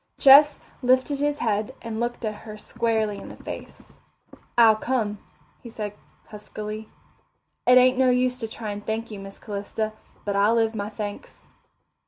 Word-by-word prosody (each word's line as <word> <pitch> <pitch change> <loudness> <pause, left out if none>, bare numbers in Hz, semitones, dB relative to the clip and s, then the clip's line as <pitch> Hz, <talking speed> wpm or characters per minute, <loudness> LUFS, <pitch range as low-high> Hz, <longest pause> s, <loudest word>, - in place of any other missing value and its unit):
Ches 285 +2 +8 0.2
lifted 260 +2 +2
his 290 0 0
head 220 +1 -1
and 225 -1 -5
looked 240 +1 -3
her 215 0 -5
squarely 220 -1 -1
in - - -9
the - - -10
face. - - -10 0.6
"I'll 225 -2 +7
come," 215 -3 -1 0.4
he 235 - -10
said 210 -2 -5 0.4
huskily. 215 +1 -7 0.8
"It 250 0 +8
ain't 255 +1 +5
no 260 -1 +5
use 250 0 +1
to 225 - -3
try 220 -1 -6
and 205 0 -6
thank 220 +1 -3
you, 205 - -7
Miss 195 0 -10
Calista. 215 +1 -4 0.3
But 200 -1 -1
I'll 205 +3 +4
live 225 -1 +2
my 205 -1 -3
thanks." 210 -1 -7
220 Hz, 160 wpm, -25 LUFS, 210-250 Hz, 0.8 s, Ches